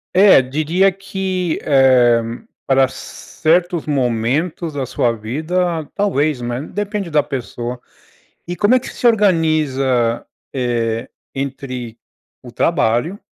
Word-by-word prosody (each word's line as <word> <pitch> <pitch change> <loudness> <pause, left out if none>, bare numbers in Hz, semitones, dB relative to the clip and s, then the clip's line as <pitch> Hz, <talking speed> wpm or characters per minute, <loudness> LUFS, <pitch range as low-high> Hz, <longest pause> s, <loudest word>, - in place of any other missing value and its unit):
É, 190 -8 +7
diria 155 +8 +1
que, 190 -2 -3
eh, 130 -4 +4 0.5
para 135 -1 +4
certos 170 +4 -1
momentos 140 +5 -1
da 135 -2 -2
sua 120 -1 0
vida, 160 +8 -2
talvez, 155 -9 +1
né, 120 +2 -3
depende 205 +2 -4
da 150 -2 +2
pessoa. 120 -1 -5 0.7
E 175 - -3
como 205 +6 +3
é 255 - +5
que - - -8
se - - -6
organiza, 155 - +2 0.3
eh, 115 -3 -1 0.3
entre 130 -4 -5 0.5
o 120 - -11
trabalho, 150 - 0
145 Hz, 110 wpm, -18 LUFS, 125-180 Hz, 0.7 s, É